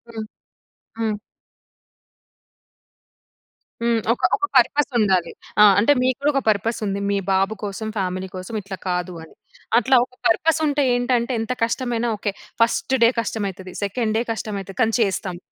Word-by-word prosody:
హ్మ్. 220 -1 -4 0.7
హ్మ్. 215 -2 -1 2.6
హ్మ్. 235 -1 +2
ఒక - - -10
ఒక 390 - -1
పర్పస్ 280 +3 +3
ఉండాలి. 190 -5 +2 0.3
ఆ! - - +10 0.2
అంటే 225 +7 +4
మీకు 255 0 +2
గూడా 295 +1 +3
ఒక 275 - +1
పర్పస్ 215 +2 0
ఉంది. 200 0 -2
"మీ 200 - +1
బాబు 195 +2 +2
కోసం, 205 +2 -4
ఫ్యామిలీ 185 -1 -2
కోసం 185 +5 -6
ఇట్లా 195 -1 -7
కాదు" 180 0 -2
అని. 160 - -16 0.4
అట్లా 260 +2 +3
ఒక 250 - -26
పర్పస్ 320 +8 +2
ఉంటే 290 0 +1
ఏంటంటే 245 0 +1
ఎంత 225 - -3
కష్టమైనా 235 0 -1
okay. 205 -1 -3 0.3
First 230 +3 +2
day 230 - +7
కష్టమైతది, 195 -4 -5
second 215 +2 -1
day - - 0
కష్టమైతది 200 -3 -6
కానీ 225 -1 +2
చేస్తాం. 190 -3 -1
220 Hz, 145 wpm, -22 LUFS, 195-245 Hz, 2.6 s, ఆ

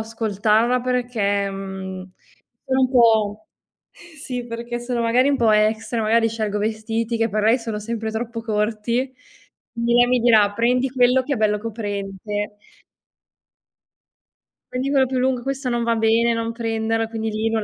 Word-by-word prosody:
ascoltarla 220 +2 +1
perché, 240 -6 0
mhmm, 190 -1 -7 0.5
sono 265 -1 +1
un 255 -1 +2
po', 220 -4 +3 0.4
sì, 285 -7 -8
perché 235 +1 -5
sono 240 0 -2
magari 245 +4 +3
un 280 - +2
po' 230 -3 +3
extra, 220 +2 +1
magari 225 +1 +3
scelgo 215 -2 -2
vestiti 225 +2 -2
che 225 0 +1
per 215 +1 -1
lei 230 +4 +4
sono 225 -2 -4
sempre 220 +1 -4
troppo 230 +1 -4
corti, 225 +4 -1 0.6
indi 235 0 0
lei 245 0 +6
mi 250 0 +3
dirà: 220 -4 +5
"Prendi 250 +4 +1
quello 250 0 +3
che 280 +2 -2
è - - -4
bello 210 -1 +1
coprente" 205 -1 -5 2.2
"prendi 260 +2 -2
quello 270 -2 +3
più 260 +1 -2
lungo, 255 -1 +1
questo 270 +1 -4
non 240 -1 0
va 230 0 +1
bene, 225 +1 +3
non 230 0 -2
prenderla." 225 -1 -1
Quindi 225 -1 -4
lì 220 +1 -1
non 225 -1 -1
225 Hz, 155 wpm, -21 LUFS, 215-245 Hz, 2.2 s, lei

